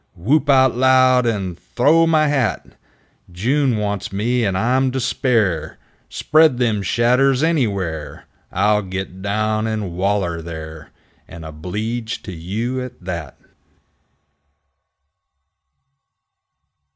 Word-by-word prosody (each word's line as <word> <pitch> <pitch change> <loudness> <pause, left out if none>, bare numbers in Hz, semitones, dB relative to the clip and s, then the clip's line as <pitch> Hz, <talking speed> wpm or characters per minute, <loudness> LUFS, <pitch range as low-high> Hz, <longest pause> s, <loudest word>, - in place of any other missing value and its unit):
Whoop 145 - +1
out 130 -3 +4
loud! 130 -1 +4
And 95 -6 -2 0.2
th'ow 155 +7 +4
my 155 -2 +3
hat! 135 -6 -1 0.6
June 125 +7 0
wants 105 -3 -3
me, 120 +5 0
and 95 -3 0
I'm 130 +6 +1
to 130 - -1
spare! 110 - 0 0.3
Spread 155 -4 +3
them 115 -5 0
shadders 125 +6 +2
anywhere, 100 - -2 0.3
I'll 105 0 +2
git 95 -1 -6
down 110 +2 -1
and 110 -4 -3
waller 95 -3 -1
there, 80 -1 -9 0.4
And 80 -1 -10
obleeged 105 +9 -5
to 95 - -6
you 110 +10 -4
at 125 - -10
that! 85 -5 -6
110 Hz, 105 wpm, -19 LUFS, 95-130 Hz, 0.6 s, out